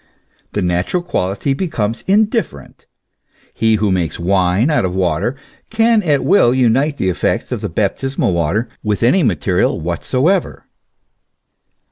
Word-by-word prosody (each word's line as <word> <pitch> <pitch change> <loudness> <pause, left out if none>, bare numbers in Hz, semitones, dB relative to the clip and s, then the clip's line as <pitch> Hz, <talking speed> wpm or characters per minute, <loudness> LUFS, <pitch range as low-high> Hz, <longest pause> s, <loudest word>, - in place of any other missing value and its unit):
The 105 - -1
natural 90 - -1
quality 100 - -1
becomes 130 - -3
indifferent: 210 - -1 0.7
he 110 -1 +2
who 105 -1 0
makes 85 -5 -1
wine 95 - +1
out 150 - +1
of 90 -1 -2
water, 90 - 0 0.3
can 225 0 +3
at 150 -7 +1
will 130 -11 +4
unite 130 +4 +2
the 95 - 0
effects 90 - -1
of - - -4
baptismal 135 -8 -1
water 85 +8 0
with 105 0 -2
any 130 +11 +4
material 90 - 0
whatsoever. 130 - -1
115 Hz, 125 wpm, -17 LUFS, 90-150 Hz, 0.7 s, will